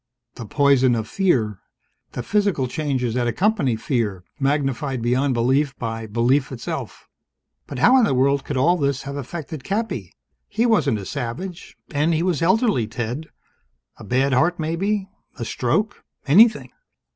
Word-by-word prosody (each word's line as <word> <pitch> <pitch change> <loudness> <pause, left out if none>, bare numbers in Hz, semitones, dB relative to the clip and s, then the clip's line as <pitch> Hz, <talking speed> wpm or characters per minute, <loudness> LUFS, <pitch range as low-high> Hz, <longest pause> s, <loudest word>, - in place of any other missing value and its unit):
"The 115 -3 -9
poison 135 -1 +3
of 110 -1 -3
fear. 115 - 0 0.5
The 120 - -4
physical 200 - +1
changes 130 -4 -2
that 120 0 0
accompany 180 - +1
fear, 110 -6 -2 0.2
magnified 135 -1 0
beyond 130 +2 +1
belief 135 +4 +1
by 115 -1 -4
belief 125 +6 +1
itself." 120 -3 -6 0.6
"But 140 - -7
how 245 - +5
in 240 - +4
the 135 - +1
world 140 +2 +2
could 145 - -4
all 170 +8 +3
this 140 -3 -1
have 140 0 -6
affected 150 +1 -6
Cappy? 195 - -3 0.4
He 225 +3 0
wasn't 180 - +2
a 100 - -7
savage. 145 - -6
And 155 +2 +1
he 160 - 0
was 175 -4 0
elderly, 190 - +2
Ted. 120 +7 -4 0.7
A - - -12
bad 130 +2 +1
heart, 165 +7 +2
maybe. 190 +6 -1 0.3
A 120 - -4
stroke. 165 - -1 0.2
Anything." 215 +10 +5
140 Hz, 150 wpm, -22 LUFS, 120-170 Hz, 0.7 s, how